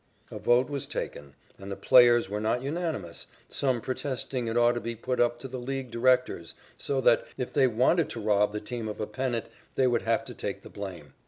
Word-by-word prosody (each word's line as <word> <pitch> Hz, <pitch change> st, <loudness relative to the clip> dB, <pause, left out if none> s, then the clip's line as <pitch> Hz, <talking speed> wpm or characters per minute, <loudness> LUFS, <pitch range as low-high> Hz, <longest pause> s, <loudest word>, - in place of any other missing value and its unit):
A -, -, -6 dB
vote 120 Hz, +2 st, +3 dB
was 140 Hz, -2 st, -4 dB
taken, 70 Hz, 0 st, -5 dB, 0.2 s
and 95 Hz, +1 st, -8 dB
the -, -, -3 dB
players 120 Hz, -1 st, +6 dB
were 105 Hz, +2 st, -3 dB
not 115 Hz, +3 st, 0 dB
unanimous, 155 Hz, -, -4 dB, 0.2 s
some 130 Hz, -4 st, 0 dB
protesting 130 Hz, -1 st, -3 dB
it 115 Hz, +1 st, -1 dB
ought 120 Hz, 0 st, +5 dB
to 120 Hz, 0 st, -3 dB
be 115 Hz, +2 st, -4 dB
put 125 Hz, +3 st, -3 dB
up 120 Hz, 0 st, +3 dB
to 135 Hz, -, -5 dB
the 130 Hz, 0 st, -6 dB
League 130 Hz, 0 st, -4 dB
directors 125 Hz, -8 st, +1 dB, 0.2 s
so 135 Hz, -1 st, -2 dB
that, 120 Hz, -, +4 dB
if 125 Hz, -2 st, -4 dB
they 130 Hz, -, +4 dB
wanted 130 Hz, +8 st, +2 dB
to 115 Hz, -, -5 dB
rob 105 Hz, -1 st, +2 dB
the 105 Hz, -, -3 dB
team 115 Hz, 0 st, -5 dB
of 105 Hz, -, -6 dB
a 105 Hz, -, -1 dB
pennant, 120 Hz, +2 st, -2 dB, 0.3 s
they 130 Hz, -, +3 dB
would 120 Hz, -2 st, +2 dB
have 115 Hz, 0 st, 0 dB
to -, -, -8 dB
take -, -, -5 dB
the -, -, -12 dB
blame. 90 Hz, -9 st, -8 dB
120 Hz, 220 wpm, -28 LUFS, 105-130 Hz, 0.3 s, players